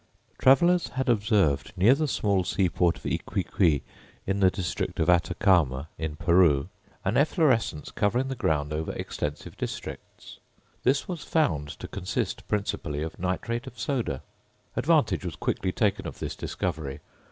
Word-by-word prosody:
Travellers 170 Hz, +7 st, +5 dB
had 130 Hz, -1 st, -2 dB
observed 105 Hz, -, +2 dB
near 100 Hz, +8 st, +6 dB
the 155 Hz, +2 st, 0 dB
small 100 Hz, -7 st, +1 dB
seaport 90 Hz, -2 st, +1 dB
of -, -, -16 dB
Yquiqui, 80 Hz, -7 st, 0 dB, 0.4 s
in 95 Hz, +1 st, 0 dB
the 95 Hz, -1 st, +6 dB
district 90 Hz, -1 st, -3 dB
of 80 Hz, +3 st, +4 dB
Atacama, 85 Hz, -5 st, +2 dB
in 80 Hz, -2 st, -3 dB
Peru, 85 Hz, -4 st, +3 dB, 0.4 s
an 100 Hz, +5 st, +1 dB
efflorescence 140 Hz, -, +2 dB
covering 120 Hz, +6 st, +1 dB
the 135 Hz, -, -2 dB
ground 75 Hz, -, 0 dB
over 80 Hz, +1 st, -2 dB
extensive 75 Hz, 0 st, -5 dB
districts. -, -, -7 dB, 0.4 s
This 135 Hz, +2 st, +2 dB
was 175 Hz, -4 st, -5 dB
found 80 Hz, -, +1 dB
to -, -, -6 dB
consist 95 Hz, +2 st, -3 dB
principally 80 Hz, -8 st, -2 dB
of 80 Hz, -, -6 dB
nitrate 95 Hz, +7 st, -2 dB
of 120 Hz, -, -10 dB
soda. 115 Hz, -, -2 dB, 0.5 s
Advantage -, -, +2 dB
was -, -, -4 dB
quickly 95 Hz, -, -1 dB
taken 105 Hz, 0 st, 0 dB
of -, -, -7 dB
this -, -, -4 dB
discovery. 75 Hz, -6 st, -4 dB
95 Hz, 140 wpm, -27 LUFS, 80-120 Hz, 0.5 s, near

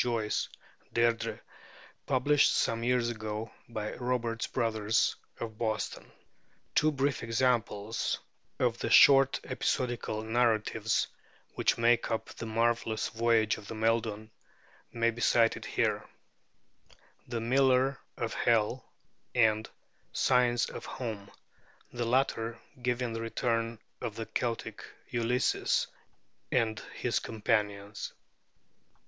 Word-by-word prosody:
Joyce 115 Hz, -3 st, -1 dB, 0.5 s
('Deirdrê'), 115 Hz, -1 st, +1 dB, 0.7 s
published 140 Hz, +2 st, +4 dB
some 115 Hz, 0 st, +1 dB
years 125 Hz, -1 st, +2 dB
ago 110 Hz, 0 st, -5 dB, 0.2 s
by 110 Hz, -2 st, -4 dB
Roberts 120 Hz, -2 st, -1 dB
Brothers 110 Hz, -1 st, +1 dB, 0.2 s
of 110 Hz, -2 st, -6 dB
Boston. 110 Hz, -2 st, -2 dB, 0.6 s
Two 155 Hz, +1 st, +4 dB
brief 140 Hz, -3 st, 0 dB
examples 115 Hz, -3 st, 0 dB, 0.4 s
of -, -, +1 dB
the -, -, -2 dB
short 135 Hz, -1 st, +7 dB
episodical 120 Hz, -4 st, -1 dB
narratives 115 Hz, -1 st, +1 dB, 0.5 s
which -, -, +1 dB
make 120 Hz, 0 st, +3 dB
up 115 Hz, -, -2 dB
the 115 Hz, -, -7 dB
marvelous 115 Hz, 0 st, 0 dB
'Voyage 115 Hz, -2 st, +2 dB
of 105 Hz, -, -11 dB
Maeldun' 110 Hz, -1 st, -1 dB, 0.6 s
may 115 Hz, 0 st, +2 dB
be 115 Hz, +1 st, -8 dB
cited 115 Hz, -2 st, +3 dB
here, -, -, 0 dB, 1.2 s
'The 120 Hz, -2 st, -2 dB
Miller 130 Hz, +2 st, +3 dB, 0.2 s
of 115 Hz, -, -2 dB
Hell' 115 Hz, +2 st, +2 dB, 0.5 s
and 110 Hz, -2 st, +3 dB, 0.4 s
'Signs 125 Hz, -2 st, +3 dB
of -, -, -7 dB
Home,' 110 Hz, -5 st, -5 dB, 0.6 s
the 120 Hz, -1 st, -2 dB
latter 115 Hz, -2 st, +1 dB, 0.2 s
giving 125 Hz, -1 st, -1 dB
the 115 Hz, -, -3 dB
return 115 Hz, 0 st, -1 dB, 0.2 s
of 110 Hz, -, -4 dB
the 115 Hz, -, -4 dB
Celtic 115 Hz, 0 st, -3 dB, 0.3 s
Ulysses 120 Hz, +2 st, +1 dB, 0.7 s
and 110 Hz, -4 st, +1 dB, 0.2 s
his -, -, 0 dB
companions. 105 Hz, -2 st, -2 dB
115 Hz, 105 wpm, -30 LUFS, 110-120 Hz, 1.2 s, short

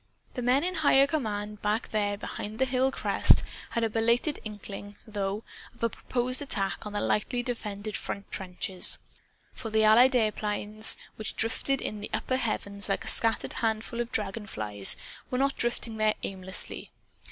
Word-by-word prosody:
The 250 Hz, -, -3 dB
men 250 Hz, +4 st, +3 dB
in 365 Hz, +1 st, 0 dB
higher 285 Hz, -5 st, +5 dB
command, 210 Hz, -8 st, -3 dB
back 210 Hz, +2 st, 0 dB
there 205 Hz, -1 st, 0 dB
behind 210 Hz, +1 st, -5 dB
the 265 Hz, -, +3 dB
hill 260 Hz, +1 st, +2 dB
crest, -, -, +4 dB, 0.3 s
had 235 Hz, -, -1 dB
a -, -, +4 dB
belated 235 Hz, +7 st, +2 dB
inkling, 205 Hz, -1 st, -7 dB
though, 205 Hz, 0 st, -3 dB, 0.3 s
of 235 Hz, -, -11 dB
a 230 Hz, -, +3 dB
proposed 255 Hz, +3 st, 0 dB
attack 210 Hz, -6 st, -2 dB
on 210 Hz, -, -7 dB
the 205 Hz, -, 0 dB
lightly 245 Hz, +4 st, 0 dB
defended 215 Hz, -4 st, -4 dB
front 200 Hz, -, -5 dB
trenches. 185 Hz, -1 st, 0 dB, 0.6 s
For 230 Hz, -, -6 dB
the 220 Hz, 0 st, +3 dB
Allied 240 Hz, +5 st, +7 dB
airplanes 215 Hz, -1 st, +4 dB, 0.2 s
which 215 Hz, -, -5 dB
drifted 255 Hz, +4 st, 0 dB
in 210 Hz, -, -3 dB
the 210 Hz, -, -5 dB
upper 255 Hz, -, 0 dB
heavens 200 Hz, -4 st, -2 dB
like 195 Hz, -, 0 dB
a -, -, -8 dB
scattered 225 Hz, -1 st, +1 dB
handful 225 Hz, +1 st, -1 dB
of 235 Hz, -, -4 dB
dragon 210 Hz, 0 st, -2 dB
flies 105 Hz, -, 0 dB, 0.3 s
were 250 Hz, -, -1 dB
not 275 Hz, +1 st, +2 dB
drifting 235 Hz, -2 st, -1 dB
there 215 Hz, 0 st, +3 dB
aimlessly. 190 Hz, -1 st, -5 dB
220 Hz, 165 wpm, -29 LUFS, 205-245 Hz, 0.6 s, Allied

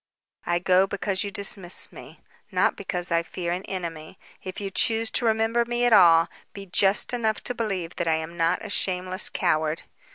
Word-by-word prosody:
"I 175 Hz, -, +2 dB
go 185 Hz, +2 st, +3 dB
because 195 Hz, -1 st, -2 dB
you 200 Hz, -, -4 dB
dismiss 195 Hz, -2 st, 0 dB
me, -, -, -13 dB, 0.3 s
not -, -, +2 dB
because 175 Hz, -2 st, -3 dB
I 170 Hz, 0 st, +3 dB
fear 170 Hz, +1 st, -5 dB
an 180 Hz, +1 st, -2 dB
enemy. 170 Hz, -2 st, -6 dB, 0.2 s
If 185 Hz, 0 st, -7 dB
you 200 Hz, -1 st, -5 dB
choose 225 Hz, +2 st, +1 dB
to 245 Hz, -, +1 dB
remember 225 Hz, +2 st, +2 dB
me 240 Hz, +1 st, -1 dB
at 240 Hz, -, +3 dB
all, 165 Hz, -5 st, +6 dB, 0.3 s
be 200 Hz, -1 st, -9 dB
just 195 Hz, +4 st, +3 dB
enough 220 Hz, -3 st, -1 dB
to 250 Hz, -, -2 dB
believe 195 Hz, -8 st, -4 dB
that 175 Hz, -, -2 dB
I 160 Hz, -, +3 dB
am 160 Hz, +1 st, -5 dB
not 170 Hz, +4 st, 0 dB
a -, -, -6 dB
shameless 185 Hz, 0 st, -1 dB
coward." 160 Hz, -3 st, 0 dB
185 Hz, 190 wpm, -25 LUFS, 170-210 Hz, 0.3 s, all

